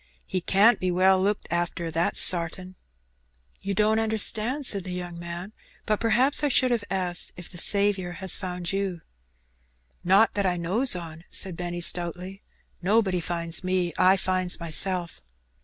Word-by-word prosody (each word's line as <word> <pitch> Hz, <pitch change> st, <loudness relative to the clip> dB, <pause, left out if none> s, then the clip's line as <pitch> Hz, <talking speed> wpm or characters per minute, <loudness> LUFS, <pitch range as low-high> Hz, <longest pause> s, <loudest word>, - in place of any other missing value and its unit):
He 185 Hz, -, -3 dB
can't 205 Hz, +7 st, +3 dB
be 185 Hz, -, -1 dB
well 185 Hz, +1 st, +3 dB
looked 200 Hz, +2 st, -1 dB
arter, 170 Hz, -1 st, -2 dB
that's 165 Hz, +2 st, 0 dB
sartin/' 180 Hz, +1 st, 0 dB, 0.9 s
''You 200 Hz, 0 st, -3 dB
don't 215 Hz, +2 st, +2 dB
understand," 225 Hz, +5 st, 0 dB
said 200 Hz, -5 st, +3 dB
the 185 Hz, -, -7 dB
young 175 Hz, -1 st, -6 dB
man; 170 Hz, +4 st, -7 dB, 0.3 s
''but 215 Hz, -2 st, 0 dB
perhaps 245 Hz, +6 st, +2 dB
I -, -, +3 dB
should 255 Hz, -2 st, +2 dB
have 235 Hz, -3 st, 0 dB
asked 180 Hz, -2 st, -1 dB
if 180 Hz, -, -8 dB
the 175 Hz, -, -6 dB
Saviour 200 Hz, -3 st, +2 dB
has 190 Hz, 0 st, -1 dB
found 180 Hz, -1 st, -5 dB
you?" 195 Hz, -4 st, -3 dB, 1.0 s
'^Not 195 Hz, +5 st, +4 dB
that 200 Hz, -2 st, 0 dB
I 180 Hz, -1 st, -1 dB
knows 190 Hz, +9 st, +1 dB
on," 165 Hz, -2 st, -8 dB
said 190 Hz, -3 st, +1 dB
Benny, 175 Hz, 0 st, -5 dB
stoutly. 180 Hz, +3 st, -1 dB, 0.4 s
''Nobody 190 Hz, -1 st, +1 dB
finds 170 Hz, 0 st, 0 dB
me; 185 Hz, -2 st, -1 dB
I 190 Hz, +1 st, +4 dB
finds 185 Hz, -1 st, 0 dB
myself." 175 Hz, +1 st, -1 dB
185 Hz, 155 wpm, -25 LUFS, 175-205 Hz, 1.0 s, ^Not